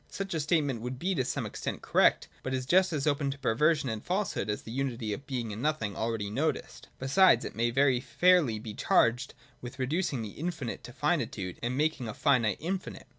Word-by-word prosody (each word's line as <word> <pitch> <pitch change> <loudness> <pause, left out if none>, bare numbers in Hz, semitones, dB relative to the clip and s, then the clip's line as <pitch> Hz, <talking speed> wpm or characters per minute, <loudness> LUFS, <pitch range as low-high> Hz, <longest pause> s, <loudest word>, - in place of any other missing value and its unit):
Such 195 -1 -4
a 160 - 0
statement 145 -6 0
would 125 +2 -4
be 185 +8 -1
to 135 -7 0
some 125 - -2
extent - - -5
correct; - - +3
but 130 0 -2
is 130 -1 -3
just 185 +6 +4
as 150 -4 -1
open 145 -2 +1
to 135 - -4
perversion 140 +4 +2
and 110 -3 -3
falsehood 185 - -1
as 105 - -2
the 110 - -8
unity 120 -4 -2
of 135 +6 -8
Being 120 -5 -3
and 110 - -6
Nothing 130 -9 -1
already 110 -2 -2
noticed. 145 +8 -2
Besides 135 0 +4
it - - -6
may 115 +1 +1
very 130 0 +3
fairly 140 0 +3
be 110 0 -7
charged 115 +4 +2 0.3
with 125 +1 -8
reducing 135 -1 -1
the 105 - -5
infinite 150 - -4
to - - -9
finitude 90 -2 -2
and 120 +2 -2
making 150 -5 0
a 110 - -6
finite 125 -7 +2
infinite. 185 +4 -4
130 Hz, 205 wpm, -29 LUFS, 115-155 Hz, 0.3 s, just